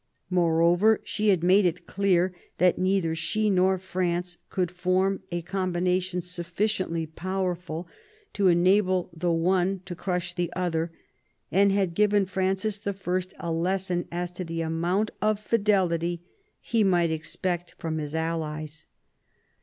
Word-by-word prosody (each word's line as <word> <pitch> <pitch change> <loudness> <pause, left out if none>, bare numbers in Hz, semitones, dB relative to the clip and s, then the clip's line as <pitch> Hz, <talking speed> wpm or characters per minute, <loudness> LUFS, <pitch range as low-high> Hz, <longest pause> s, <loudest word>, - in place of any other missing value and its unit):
Moreover, 175 +4 +4
she 215 - -1
had 185 -4 +3
made 190 +3 +5
it 180 -1 -1
clear 185 -2 +1 0.2
that 180 0 +3
neither 185 -3 +1
she 215 +6 0
nor 190 0 +3
France 180 -1 -2
could 180 -2 -1
form 185 +2 +1
a 175 -1 -2
com 185 +1 -2
bination 180 0 0
sufficiently 180 0 -2
powerful 180 0 -3 0.5
to 200 -2 +2
enable 185 +1 +3
the 170 +1 0
one 180 +3 +1
to 185 - -5
crush 180 0 -3
the 175 -1 -2
other, 170 -2 -1 0.6
and 200 +2 +4
had 195 -3 +1
given 205 +1 +3
Francis 190 +2 -1
I. 200 - -1 0.4
a 170 - -4
lesson 180 +1 0
as 175 0 -3
to 180 +1 -5
the 165 -1 -4
amount 170 +6 0
of 215 -1 +2
fidelity 185 -6 +1 0.4
he 230 -2 +1
might 175 -4 +3
expect 175 +2 -3
from 160 -2 -3
his 150 0 -5
allies. 155 -1 -3
180 Hz, 140 wpm, -26 LUFS, 170-190 Hz, 0.6 s, made